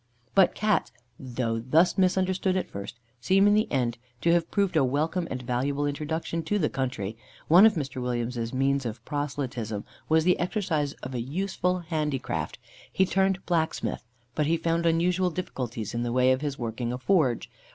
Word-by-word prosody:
But 195 -2 +5
Cats, 210 -1 +1 0.3
though 120 -3 -2
thus 155 +10 +3
misunderstood 185 0 +2
at 185 - -3
first, 100 +4 -7 0.2
seem 190 +9 +4
in 205 - +5
the 215 +1 +2
end 120 -3 0 0.2
to 170 - +3
have 170 -1 +1
proved 200 -4 0
a 155 - +5
welcome 155 +7 0
and 130 -1 -4
valuable 135 +4 -1
introduction 155 +3 -2
to 205 +6 +1
the 155 -7 0
country. 120 -6 -3 0.3
One 180 +7 +8
of 215 - +1
Mr. 135 -5 -3
Williams's 120 -1 -2
means 135 +1 +1
of 115 -2 -6
proselytism 130 -7 -3 0.2
was, 160 0 +4
the 180 +2 +3
exercise 170 -6 -1
of 130 - -5
a 120 - -2
useful 180 +5 -1
handicraft 155 -5 -2 0.3
he 190 - +3
turned 190 0 +1
blacksmith; 165 -3 -1 0.3
but 150 +2 0
he 165 +1 +2
found 165 +1 0
unusual 180 +2 +2
difficulties 125 - -4
in 120 - -1
the 120 0 -1
way 125 +1 +4
of 130 +1 +1
his 145 -2 -3
working 120 0 -3
a 125 - -3
forge. 130 - +2
150 Hz, 175 wpm, -27 LUFS, 125-180 Hz, 0.3 s, One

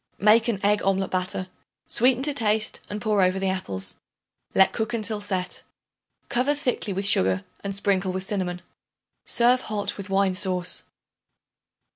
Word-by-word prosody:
Make 220 +3 +5
an 225 -5 0
egg 205 0 +3
omelet 195 0 +1
batter; 185 0 -2 0.4
sweeten 255 +2 +2
to 295 0 +3
taste 215 -4 +1
and 210 - -4
pour 210 -2 +1
over 185 +1 +3
the 190 0 0
apples; 95 - -3 0.6
let 190 - +5
cook 220 +1 -2
until 215 -1 -2
set. 185 -3 -3 0.7
Cover 260 +4 +1
thickly 250 -7 -2
with 195 +1 -2
sugar 95 - +2 0.2
and 200 -1 -3
sprinkle 195 -2 +1
with 185 0 -3
cinnamon. 185 -3 -3 0.6
Serve 245 +2 +3
hot 210 -3 -1
with 200 -1 -7
wine 195 -1 +2
sauce. 185 -1 -2
200 Hz, 150 wpm, -25 LUFS, 185-220 Hz, 0.7 s, Make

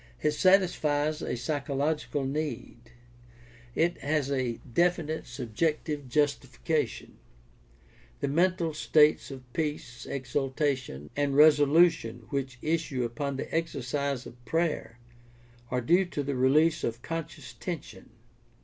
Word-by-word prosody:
It 150 - +2
satisfies 155 -4 +2
a - - -2
psychological 145 +2 -1
need. 125 -5 -4 0.9
It 170 +2 +1
has 145 -1 0
a 130 -3 0 0.2
definite 170 -2 +1
subjective 140 +3 -2
justification. 145 +2 -1 1.0
The 140 - -1
mental 170 +2 +1
states 150 0 +3
of 135 -2 -8
peace, 145 -6 -3
exultation, 135 - -2
and 145 -1 0
resolution 145 -5 +5
which 135 -3 -2
issue 155 -5 0
upon 135 +4 -3
the - - -6
exercise 140 -4 -2
of 120 0 -13
prayer 155 -3 -1 0.7
are 125 0 0
due 175 +10 +4
to 150 -5 -3
the 140 +1 -2
release 150 +6 +3
of 115 +1 -3
conscious 165 -1 -6
tension. - - -7
145 Hz, 110 wpm, -28 LUFS, 130-155 Hz, 1.0 s, resolution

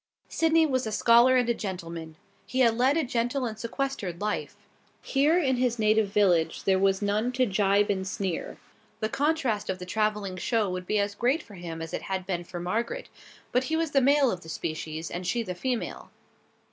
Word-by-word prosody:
Sydney 325 0 +3
was 255 -5 0
a - - -3
scholar 235 +4 +5
and 245 -2 +2
a 235 - +3
gentleman. 170 -6 -6 0.3
He 260 - 0
had 230 -3 +4
led 260 +5 +3
a 325 - +2
gentle 245 +1 -1
and 220 -2 -5
sequestered 230 -8 -3
life. 210 0 -3 0.5
Here 290 +5 +3
in 265 -7 +2
his 245 -1 +1
native 215 -1 +3
village 195 -5 +2
there 190 -1 +3
were 195 0 +4
none 210 +4 0
to 255 0 +2
gibe 200 -1 +2
and 190 -1 -2
sneer. 190 -3 -3 0.4
The 215 -1 -1
contrast 265 -7 0
of 190 - -1
the 180 - -8
traveling 210 -1 -1
show 215 0 0
would 180 0 -5
be 215 - +1
as 200 0 0
great 255 +9 +1
for 210 - -15
him 170 -3 -6
as 165 - -8
it - - -2
had 190 -1 -3
been 175 -2 -2
for 175 0 -7
Margaret, 230 - -3 0.4
but 250 +1 +2
he 320 - -1
was 325 -2 0
the 275 - +4
male 275 -1 +4
of 180 - -5
the 160 - -12
species, 160 0 -4
and 180 0 -4
she 235 +6 0
the 185 - -4
female. 245 +6 -3
215 Hz, 205 wpm, -27 LUFS, 185-255 Hz, 0.5 s, scholar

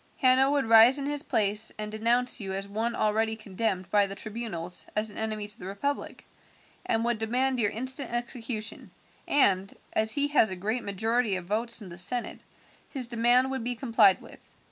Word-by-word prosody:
Hanno 260 0 +4
would 280 -3 +1
rise 225 +4 +7
in 280 - -4
his 290 0 -1
place 210 -6 +1
and 210 0 -4
denounce 240 +4 +1
you 195 -3 -4
as 195 +1 -4
one 220 +4 -2
already 220 +1 0
condemned 195 -3 -3
by 205 -1 +3
the 195 - -7
tribunals 200 -5 -6
as 215 0 -1
an - - -12
enemy 215 -1 -2
to 210 - -4
the 180 - -8
republic, 280 +9 -4 0.6
and 225 +1 +1
would 240 -2 0
demand 250 +3 0
your 210 -3 +3
instant 260 +3 -5
execution, 235 -2 -4 0.4
and, 195 -9 +2 0.2
as 220 0 +2
he 285 0 0
has 280 -7 +3
a 190 - -3
great 215 +7 -2
majority 220 +2 0
of 185 -1 -5
votes 225 +3 0
in 190 - -10
the 170 +1 -6
senate, 240 +7 0 0.5
his 265 -4 -2
demand 240 +2 +3
would 265 -3 -3
be 245 +1 -2
complied 225 -6 +4
with. - - -14
225 Hz, 190 wpm, -27 LUFS, 205-245 Hz, 0.6 s, rise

